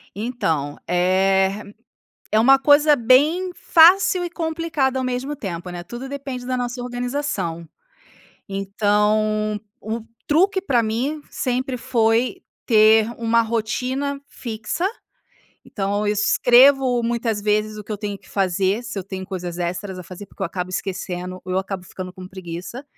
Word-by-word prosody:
Então, 165 - -2
eh, 190 +3 +2 0.7
é 215 - +4
uma 270 +4 +6
coisa 295 +2 +5
bem 290 +9 +3
fácil 355 +2 +5
e - - -4
complicada 320 -6 -1
ao 260 - -2
mesmo 255 +3 -3
tempo, 180 -8 -6
né, 175 -1 -6
tudo 240 +8 -8
depende 270 -3 -6
da 255 0 -1
nossa 245 0 -3
organização. 245 - -3 0.8
Então, 210 +2 +1 0.2
o 220 +2 -4 0.3
truque 380 +6 +3
pra 245 -11 +2
mim 255 +8 -2
sempre 255 0 -2
foi 240 +6 +1 0.2
ter 220 -1 +5
uma 230 0 +2
rotina 250 +5 -2
fixa. 230 +9 -4 0.8
Então 205 +1 -2
eu 210 - +2
escrevo 245 +4 +5
muitas 230 -2 -1
vezes 215 +1 0
o 210 - -8
que 215 - -6
eu 210 - -4
tenho 205 -1 -4
que - - -22
fazer, 195 +2 0
se 235 -3 -6
eu 185 - -5
tenho 190 -1 -6
coisas 180 -2 -5
extras 185 +2 -3
a - - -6
fazer, 185 +3 -10
porque - - -10
eu - - +1
acabo 180 +1 -5
esquecendo, 185 -1 -4
ou 185 - -4
eu 185 - +2
acabo 190 -1 -4
ficando 185 0 -8
com 185 0 -10
preguiça. 185 +7 -8
220 Hz, 150 wpm, -21 LUFS, 190-260 Hz, 0.8 s, uma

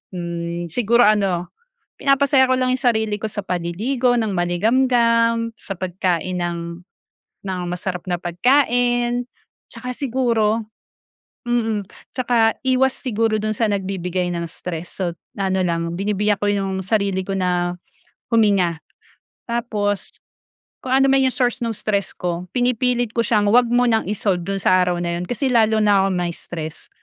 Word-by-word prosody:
Hmm, 170 0 -4
siguro 235 +3 +3
ano, 195 -5 +2 0.5
pinapasaya 275 -1 +4
ko 260 - +4
lang 255 0 +1
yung 260 - -1
sarili 220 -4 +1
ko - - -2
sa 205 - -3
paliligo 215 +10 0
ng 220 - 0
maligamgam, 230 +5 +2
sa 195 - -6
pagkain 185 -1 -1
ng 175 -1 -2 0.9
ng 190 -2 -3
masarap 180 0 -4
na 175 - 0
pagkain, 245 +4 +2 0.5
tsaka 250 - -6
siguro 235 -5 +1 0.9
mm. 225 -4 0 0.3
Tsaka 235 -3 +2
iwas 260 0 +3
siguro 225 -3 0
dun 215 0 -1
sa 225 +1 +1
nagbibigay 185 -2 -2
ng 170 -1 -3
stress, 170 0 -7
sot 175 -2 -1 0.2
ano 190 -1 0
lang 170 -1 -1
binibiyak 205 +1 0
ko 205 - +1
yung 195 -1 -1
sarili 200 -2 +1
ko 195 - -2
na 180 -1 0 0.6
huminga. 200 -7 +3 0.7
Tapos, 210 -4 -2 0.7
kung 260 - -6
anuman 270 0 +4
yung 255 - -4
source 250 -2 +1
nung 225 -2 -2
stress 200 -2 -1
ko, 175 0 -3
pinipilit 245 -1 +1
ko 235 - +2
siyang 210 -2 +2
huwag 240 +2 +5
mo 245 +1 +3
nang 225 -2 +2
i-solve 195 -4 0
do'n 195 +3 -3
sa - - +4
araw 180 -1 -1
na 170 0 -1
'yon - - -4
kasi 245 +3 -1
lalo 220 -2 +4
na 205 -2 +4
kong 190 - -1
ma-stress 170 -2 -5
210 Hz, 145 wpm, -21 LUFS, 180-240 Hz, 0.9 s, huwag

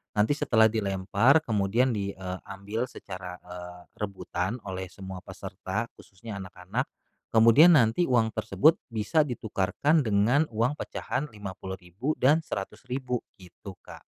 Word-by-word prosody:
nanti 105 +5 +3
setelah 110 -6 +4
dilempar, 105 +7 +3
kemudian 110 +2 +1
di, 100 -3 -3
eee, 95 -1 -5
ambil 105 +5 -4
secara, 90 -6 -8
eee, 90 0 -9 0.2
rebutan 100 +2 -3
oleh 95 -1 -5
semua 95 0 -8
peserta, - - -5
khususnya 100 +2 -9
anak-anak, 90 -1 -4 0.5
kemudian 115 +10 +8
nanti 125 +3 +4
uang 115 -3 +3
tersebut 155 +10 +3 0.2
bisa 150 +8 +2
ditukarkan 125 - +1
dengan 110 +8 +3
uang 120 +7 +1
pecahan 145 - -3
Rp50.000 95 - -5
dan 145 +5 +5
Rp100.000 125 +5 -4 0.2
gitu, 95 +2 -11
Kak. - - -12
105 Hz, 125 wpm, -27 LUFS, 95-125 Hz, 0.5 s, kemudian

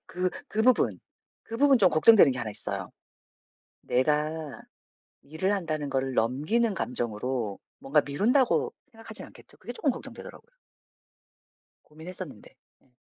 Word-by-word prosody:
그 180 +1 -1 0.2
그 220 - 0
부분, 255 +1 +3 0.4
그 230 - -7
부분 275 0 +5
좀 195 -4 +6
걱정되는 160 -2 +6
게 125 - -6
1 115 -3 -3
있어요. - - -5 0.9
내가 150 +3 -1 0.6
일을 160 +7 -2
한다는 155 -7 -2
거를 135 -1 -1
넘기는 150 - +1
감정으로 120 - -3 0.2
‘뭔가 145 +2 +2
미룬다.‘고 250 - +1 0.2
생각하지는 225 -1 -7
않겠죠? - - -17
그게 - - -8
쪼끔 320 - +1
걱정되더라고요. 365 - -10 1.3
고민했었는데. 160 - -10 0.3
음. 130 - -32
160 Hz, 295 characters per minute, -27 LUFS, 135-225 Hz, 1.3 s, 좀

